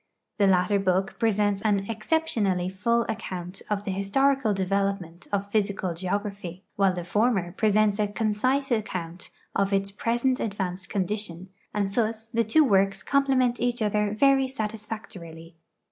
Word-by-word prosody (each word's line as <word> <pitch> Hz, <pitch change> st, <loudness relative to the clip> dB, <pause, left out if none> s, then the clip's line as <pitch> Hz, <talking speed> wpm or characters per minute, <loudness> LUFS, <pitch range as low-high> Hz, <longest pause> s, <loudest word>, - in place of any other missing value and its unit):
The 200 Hz, -, +5 dB
latter 190 Hz, +2 st, +3 dB
book 190 Hz, 0 st, 0 dB
i>resents 205 Hz, -3 st, +2 dB
an 200 Hz, -3 st, +2 dB
exceptionally 215 Hz, -, 0 dB
full 235 Hz, +5 st, +1 dB
account 185 Hz, -4 st, -5 dB
of 205 Hz, -1 st, -1 dB
the 200 Hz, -, -3 dB
historical 240 Hz, +6 st, +2 dB
development 195 Hz, -3 st, -1 dB
of 200 Hz, 0 st, -2 dB
physical 200 Hz, -4 st, 0 dB
geography, 190 Hz, 0 st, -4 dB
while 195 Hz, -1 st, +3 dB
the 180 Hz, -1 st, -4 dB
former 195 Hz, -1 st, +1 dB
pre.sents 215 Hz, +1 st, +2 dB
a 210 Hz, -, +2 dB
concise 230 Hz, +6 st, 0 dB
acciumt 185 Hz, -6 st, -3 dB, 0.3 s
of 195 Hz, 0 st, +1 dB
its 195 Hz, 0 st, 0 dB
present 240 Hz, +5 st, 0 dB
advanced 195 Hz, -2 st, -3 dB
condition, 190 Hz, -2 st, -3 dB, 0.2 s
and 205 Hz, -1 st, 0 dB
thus 220 Hz, +2 st, -1 dB
the 230 Hz, 0 st, +1 dB
two 230 Hz, +9 st, +4 dB
works 195 Hz, -6 st, +2 dB
comi)lement 265 Hz, -3 st, +2 dB
each 245 Hz, 0 st, 0 dB
other 210 Hz, 0 st, +1 dB
very 270 Hz, +2 st, +4 dB
satisfactorily. 210 Hz, -8 st, -6 dB
205 Hz, 140 wpm, -26 LUFS, 190-225 Hz, 0.3 s, The